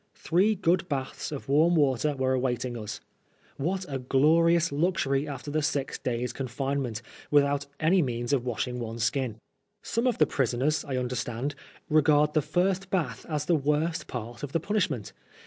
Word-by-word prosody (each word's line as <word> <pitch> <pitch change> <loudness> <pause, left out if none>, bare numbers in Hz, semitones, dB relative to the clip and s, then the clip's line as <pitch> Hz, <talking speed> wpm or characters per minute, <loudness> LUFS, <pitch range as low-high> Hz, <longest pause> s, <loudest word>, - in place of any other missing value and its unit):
Three 195 +6 +2
good 180 -1 +1
baths 135 -1 -3
of 145 - -6
warm 155 +5 +4
water 145 -1 +2
were 130 -1 +1
awaiting 125 -1 -1
us. 105 -2 -6 0.6
What 185 +6 -1
a 135 -2 -3
glorious 165 +6 +3
luxury 145 -3 +1
after 145 0 -6
the 155 +1 +1
six 145 -3 -1
days' 125 0 -2
confinement, 135 -2 -3 0.3
without 145 -1 +3
any 175 +4 +4
means 120 -2 -1
of 130 -4 +2
wash 120 -2 -2
ing 125 0 -4
one's 115 -1 -4
skin! 120 -2 0 0.5
Some 230 +3 0
of 245 - +1
the 155 - +5
prisoners, 135 +2 0
I 135 -2 -3
understand, 125 +2 -2 0.3
regard 150 -1 +4
the 155 - +3
first 185 +4 0
bath 150 - -2
as 150 -2 -1
the 175 - +2
worst 150 +3 0
part 120 -1 -6
of 145 -2 -6
the 165 - +2
punishment. 165 - -1
140 Hz, 165 wpm, -28 LUFS, 125-160 Hz, 0.6 s, the